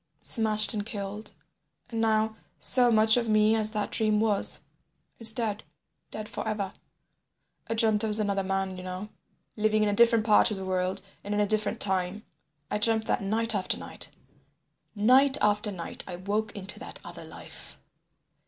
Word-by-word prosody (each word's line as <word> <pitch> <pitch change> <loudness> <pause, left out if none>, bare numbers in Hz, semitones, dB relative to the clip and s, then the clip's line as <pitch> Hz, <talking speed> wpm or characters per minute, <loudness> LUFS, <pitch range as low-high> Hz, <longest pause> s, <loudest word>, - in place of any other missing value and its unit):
"Smashed 215 -2 +4
and 210 -2 -2
killed, 205 0 -6 0.6
and 225 -1 -2
now, 220 0 +1 0.2
so 245 -2 +4
much 220 +1 +5
of 235 -2 -1
me 215 0 +4
as 215 -1 +2
that 210 -1 -3
dream 215 -1 +2
was, 210 -2 +1 0.6
is 225 -1 +4
dead. 220 -2 -2 0.5
Dead 215 0 -7
forever. 210 -3 -4 0.9
I 225 - -2
dreamt 220 -1 +3
I - - 0
was 210 0 +3
another 200 -2 0
man, 195 -1 -2
you 185 - -8
know, 185 +3 -6 0.5
living 215 0 +1
in 210 - +1
a - - 0
different 230 0 +4
part 215 +1 +5
of 210 - -4
the 190 - -6
world 185 0 -2 0.2
and 205 +1 -3
in - - 0
a 210 - +3
different 215 0 0
time. 190 +1 0 0.5
I 210 - -1
dreamt 220 0 +2
that - - -1
night 225 +3 0
after 195 -3 -1
night. - - -2 0.9
Night 260 +6 +4
after 210 +1 +1
night 175 -4 -7
I 180 - -6
woke 205 +4 -2
into 195 -1 -6
that - - -9
other - - -10
life. - - -11
215 Hz, 170 wpm, -27 LUFS, 200-220 Hz, 0.9 s, much